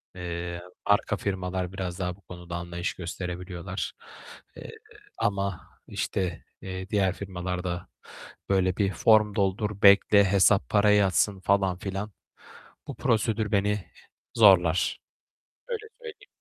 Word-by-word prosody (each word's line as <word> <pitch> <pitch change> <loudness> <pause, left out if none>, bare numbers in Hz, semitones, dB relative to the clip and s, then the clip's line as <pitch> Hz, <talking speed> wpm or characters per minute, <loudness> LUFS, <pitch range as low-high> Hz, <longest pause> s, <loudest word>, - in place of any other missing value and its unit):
Eee, 85 -1 -5 0.2
arka 105 0 +2
firmalar 95 -1 -3
biraz 90 -2 -5
daha 90 -1 -2
bu 100 - -24
konuda 90 -1 -9
anlayış 85 0 -4
gösterebiliyorlar, 90 +1 -5 0.6
eee, - - -9 0.5
ama, 100 -4 -1 0.3
işte, 90 -4 -3 0.2
eee, 95 0 -6
diğer 100 -3 +2
firmalarda 90 -2 -4 0.6
böyle 95 -2 +2
bir 100 -2 +1
form 105 +3 +4
doldur, 100 +1 -1
bekle, 100 +1 +7
hesap, 100 +1 +3
para 105 0 +4
yatsın 100 0 +3
falan 95 -1 +1
filan. 95 +2 -5 0.8
Bu - - -6
prosedür 110 0 0
beni 105 0 +1 0.5
zorlar, 95 -6 +5 0.7
öyle 445 -2 -4 0.2
söyleyeyim. 430 -3 -10
95 Hz, 115 wpm, -27 LUFS, 90-105 Hz, 0.8 s, bekle